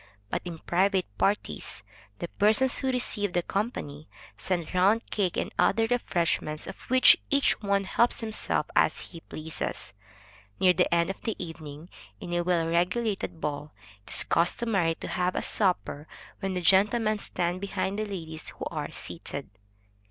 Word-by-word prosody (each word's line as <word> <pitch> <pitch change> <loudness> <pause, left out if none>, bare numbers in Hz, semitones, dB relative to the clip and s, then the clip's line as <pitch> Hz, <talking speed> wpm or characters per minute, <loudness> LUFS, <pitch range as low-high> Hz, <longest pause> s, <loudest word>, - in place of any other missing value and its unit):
But - - 0
in 170 -2 -5
private 185 +3 +1
parties, 200 - -1 0.3
the 175 - -4
persons 215 +8 +3
who 265 -1 0
receive 210 -6 0
the 175 - +1
company, 160 - -3 0.3
send 175 -3 -2
round 195 +5 +3
cake 190 -4 0
and - - -2
other 225 +3 +4
refreshments, 170 -9 0
of 195 - -7
which 255 +1 +7
each 280 -5 +2
one 200 -1 +1
helps 235 +6 +2
himself 220 -1 -1
as - - +3
he 170 - -10
pleases. 155 -1 -6 0.7
Near 185 -1 +6
the 180 - +2
end 170 +1 +3
of 195 - -11
the 225 - -2
evening, 160 -2 -8 0.3
in 175 - -6
a 175 - +2
well 170 -2 +1
regulated 180 +2 0
ball, 150 0 -4 0.3
it - - -11
is - - +4
customary 175 -1 +1
to - - -7
have 180 0 0
a - - -1
supper, 180 -6 0 0.3
when 195 -2 -2
the 180 - -1
gentlemen 210 +4 +4
stand 175 -1 -2
behind 200 0 -2
the 215 - 0
ladies 160 -5 -6
who - - -5
are - - -3
seated. - - -6
185 Hz, 160 wpm, -28 LUFS, 170-210 Hz, 0.7 s, which